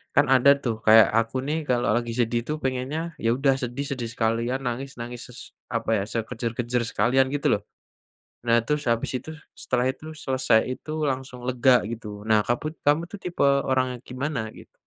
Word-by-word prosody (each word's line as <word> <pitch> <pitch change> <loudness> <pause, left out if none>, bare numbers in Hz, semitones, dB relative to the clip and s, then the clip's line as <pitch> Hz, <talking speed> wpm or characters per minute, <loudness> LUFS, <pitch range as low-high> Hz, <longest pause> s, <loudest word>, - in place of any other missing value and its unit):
Kan, 140 - +6
ada 130 +2 +5
tuh, 120 -3 0
kayak 110 0 +8
aku 115 +2 -3
nih, 150 - 0
kalo 120 -1 +2
lagi 120 -1 -1
sedih 120 0 +2
tuh, 150 - -1
pengennya 130 +4 -1 0.2
ya 115 - +3
udah 135 -1 +3
sedih, 125 +4 -3
sedih 120 -4 -3
sekalian, 115 +3 0
nangis, 130 +3 -3
nangis 120 0 -6
ses 125 - -11 0.4
apa - - -2
ya, 100 - -1
sekejer-kejer 120 +1 -2
sekalian 125 +5 +3
gitu, 145 - 0
loh. 100 - -5 0.9
Nah. 115 0 +5
terus, 150 0 0
habis 115 0 0
itu, 145 +6 -10 0.3
setelah 125 0 0
itu, 140 +3 -10 0.2
selesai 130 -4 +3
itu, 140 +4 -6 0.2
langsung 130 -1 -5
lega 125 0 +4
gitu. 115 -1 -6 0.2
Nah, 110 -1 +5
kamu, 120 +6 -1
kamu 150 +3 +4
tuh, 205 - -7
tipe 175 -1 -2 0.3
orang 130 0 +3
yang - - -22
gimana, 135 0 -2 0.2
gitu? - - -15
125 Hz, 180 wpm, -25 LUFS, 115-135 Hz, 0.9 s, kayak